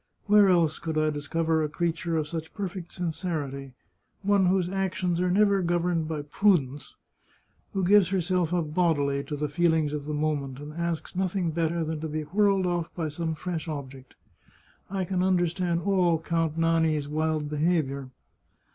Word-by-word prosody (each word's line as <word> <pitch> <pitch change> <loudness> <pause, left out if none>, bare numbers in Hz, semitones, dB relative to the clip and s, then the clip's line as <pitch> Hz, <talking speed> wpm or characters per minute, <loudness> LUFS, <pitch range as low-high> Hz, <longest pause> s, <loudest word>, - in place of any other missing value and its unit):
Where 205 -1 +6
else 165 -4 +3
could 160 -1 -3
I 155 0 +2
discover 160 +2 0
a 150 - -1
creature 165 +1 -1
of 155 -1 -1
such 160 0 -6
perfect 190 -4 -5
sincerity, 155 -6 -4 0.5
one 200 -1 +3
whose 185 -1 +2
actions 185 -2 -1
are 180 - +1
never 200 +1 +3
governed 175 -2 0
by 155 -2 -3
prudence, 145 -4 +1 0.8
who 195 - 0
gives 195 -1 +5
herself 180 -2 0
up 165 -4 -1
bodily 145 -5 +1
to 150 - -5
the 150 +1 -2
feelings 160 -1 +1
of 145 -1 -4
the 150 0 -3
moment, 145 -3 -2
and 145 +1 -8
asks 170 +1 -3
nothing 185 -2 0
better 165 +1 0
than 160 0 -3
to 160 - -4
be 155 0 -3
whirled 195 +3 +2
oflf 175 -2 -1
by 160 -3 -2
some 160 +1 -3
fresh 170 +1 -4
object? 135 -4 -7 0.7
I 190 -1 -2
can 180 0 -1
understand 175 -2 +1
all 180 -4 +2
Count 165 -1 -1
Nani's 160 -3 +2
wild 155 0 -1
behaviour 150 -3 0
165 Hz, 165 wpm, -27 LUFS, 150-180 Hz, 0.8 s, Where